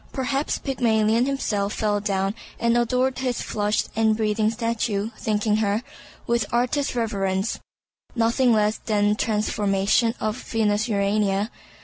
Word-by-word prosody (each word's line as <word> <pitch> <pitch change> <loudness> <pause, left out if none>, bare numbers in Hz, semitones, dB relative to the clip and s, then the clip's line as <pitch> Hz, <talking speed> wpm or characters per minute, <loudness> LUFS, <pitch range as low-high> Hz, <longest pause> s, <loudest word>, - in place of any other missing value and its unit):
Perhaps 275 +2 -1
Pygmalion 230 -3 +1
himself 210 -7 -1
fell 210 -2 0
down 195 -1 -1 0.3
and 235 0 +2
adored 250 +2 +1
his 255 -2 -1
flushed 210 0 -1
and 220 -1 +2
breathing 215 0 +1
statue, 225 -2 -1
thinking 210 0 +1
her, 215 +1 0 0.4
with 235 -3 0
artist 250 +4 0
reverence, 195 -3 -1 0.6
nothing 235 +2 +3
less 215 -1 +2
than 205 -2 +2
a - - +3
transformation 210 +1 +1
of 215 0 -1
Venus 215 -2 0
Urania. 200 0 +1
220 Hz, 125 wpm, -24 LUFS, 205-235 Hz, 0.6 s, nothing